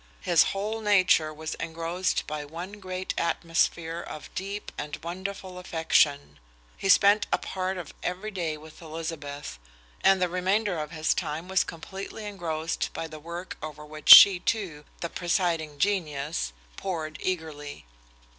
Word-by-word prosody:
His 170 -3 +5
whole 210 +3 -2
nature 185 -7 +4
was 155 +1 -5
engrossed 165 +3 -1
by 150 -1 -4
one 175 +7 -8
great 185 -1 -4
atmosphere 165 0 0
of 155 - -9
deep 200 +2 -5
and 150 0 -5
wonderful 185 +1 -5
affection. 150 - +1 0.4
He 195 - -3
spent 205 +2 +6
a - - +4
part 185 0 -3
of 175 -4 -7
every 185 +4 -3
day 170 -5 -2
with 155 +2 -14
Elizabeth, 155 - -6 0.4
and 195 0 +6
the 180 - +2
remainder 185 +1 0
of 150 -1 -4
his 160 -1 +1
time 160 0 -3
was 190 0 +3
completely 195 +5 -7
engrossed 165 -5 -3
by - - -4
the 155 -1 -10
work 170 +4 -7
over 150 0 -7
which 155 0 -7
she, 195 -3 +12
too, 175 -8 -2 0.2
the 170 - -2
presiding 170 -4 0
genius, 150 - -1 0.3
pored 160 -5 -4
eagerly. 155 - -4
170 Hz, 145 wpm, -27 LUFS, 155-190 Hz, 0.4 s, she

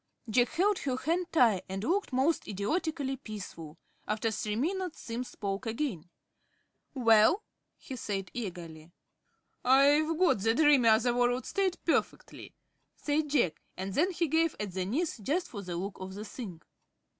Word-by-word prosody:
Jack 240 +2 +3
held 390 +3 +1
her 260 -2 -2
hand 335 +6 -1
tight, 230 - +4
and 195 +1 -4
looked 380 - 0
most 270 +6 +1
idiotically 270 - -2
peaceful. 180 -9 -8 0.3
After 215 +2 0
three 210 0 -2
minutes 355 - -2
Simms 240 +2 -5
spoke 200 +3 -4
again. 225 - -3 0.9
"Well?" 230 - +5 0.3
he 265 - -8
said, 195 -5 -4
eagerly. 170 -8 -7 0.7
"I've 285 +5 +4
got 360 - +3
the 225 +3 +2
dreamy, 285 -5 +5
other 225 +2 +4
world 245 +1 +1
state 385 -2 0
perfectly," 330 - -2 0.4
said 295 0 -1
Jack, 240 - +1 0.2
and 190 +1 -4
then 325 - +3
he 345 -2 -1
gave 320 +2 +2
at 205 -2 -3
the 185 0 -2
knees, 280 - -1
just 305 - -1
for 205 - -6
the 180 -3 -5
look 195 +2 -5
of 190 0 -7
the 210 +2 -6
thing. 200 -7 -8
245 Hz, 155 wpm, -30 LUFS, 200-310 Hz, 0.9 s, Well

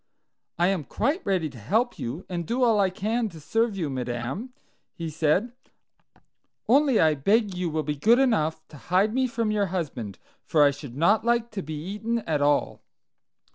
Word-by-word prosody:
"I 175 +2 +3
am 190 -5 -1
quite 290 - -1
ready 185 -5 +1
to 125 - -12
help 225 - 0
you, 135 +10 -5
and 170 -3 -4
do 250 +2 0
all 225 -4 +4
I 195 -1 +3
can 220 +5 -1
to 165 -4 -12
serve 225 +6 0
you, 170 -5 -1
madam," 130 - -4 0.4
he 165 -2 -5
said, 160 +9 +1 1.2
"only 270 0 +4
I 155 -1 +4
beg 200 - +1
you 180 -1 -2
will 155 0 -1
be 150 0 -3
good 225 +11 +4
enough 160 - +1
to 150 - -12
hide 185 - +1
me 260 +1 +2
from 230 -2 -1
your 205 -2 +1
husband, 140 - -4 0.3
for 150 -2 +3
I 145 - +5
should 140 -3 -9
not 205 +8 +3
like 235 0 +1
to 205 -2 -4
be 155 -2 -6
eaten 210 +9 -3
at 150 -3 0
all." 145 0 +1
185 Hz, 185 wpm, -26 LUFS, 150-225 Hz, 1.2 s, I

